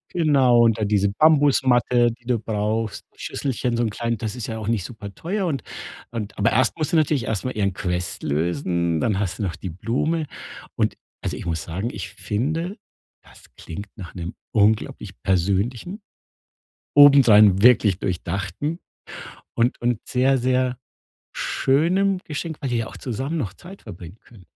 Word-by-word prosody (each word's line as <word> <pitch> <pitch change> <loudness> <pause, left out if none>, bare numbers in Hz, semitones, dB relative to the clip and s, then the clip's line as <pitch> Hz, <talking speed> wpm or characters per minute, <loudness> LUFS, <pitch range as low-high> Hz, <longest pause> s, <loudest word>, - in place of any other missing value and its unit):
Genau, 135 -7 +4
und 115 -1 +3
da 110 - 0
diese 100 -1 +2
Bambusmatte, 130 -3 +4
die 120 +1 -15
du 120 -1 +1
brauchst, 110 0 -2
Schüsselchen 125 -2 -2
so 120 - 0
'n 115 - +1
kleinen 115 +1 -2
das 110 +2 -4
ist 120 - -5
ja 110 -1 -5
auch 105 - -6
nicht 115 -5 0
superteuer 125 - -4
und 140 -7 -2 0.5
und 110 -3 -5
aber 105 +3 +2
erst 125 +6 +2
muss 155 - -1
sie - - +1
natürlich 150 -5 +2
erst 110 +1 -3
mal 130 - -1
ihren 100 -2 +1
Quest 90 -1 -3
lösen, 85 - 0
dann 105 -4 +1
hast 95 -1 -2
du 105 - -2
noch 90 -3 -2
die 95 - -6
Blume. 135 - -1 0.5
Und - - 0 0.3
also, - - -3
ich - - -7
muss 80 -2 -2
sagen, 95 +8 -3
ich - - -6
finde, 160 - -3 0.5
das - - -18
klingt 100 +6 -8
nach 95 -5 -9
'nem 85 -1 -6 0.2
unglaublich 105 - +1
persönlichen, 100 - 0 1.0
obendrein 115 -9 +7
wirklich 110 -6 +5
durchdachten 95 - -3 0.8
und 120 +1 +1
und 120 -2 0
sehr, 130 +1 +2
sehr 125 0 +1 0.6
schönem 180 +8 +1
Geschenk, 160 +1 -5
weil 135 -4 -2
ihr 120 - +1
ja 115 - -2
auch - - -11
zusammen 135 +6 -4
noch 110 -10 -3
Zeit 190 +3 -13
verbringen 90 -1 -11
könnt. 100 -7 -18
115 Hz, 165 wpm, -23 LUFS, 100-135 Hz, 1.0 s, obendrein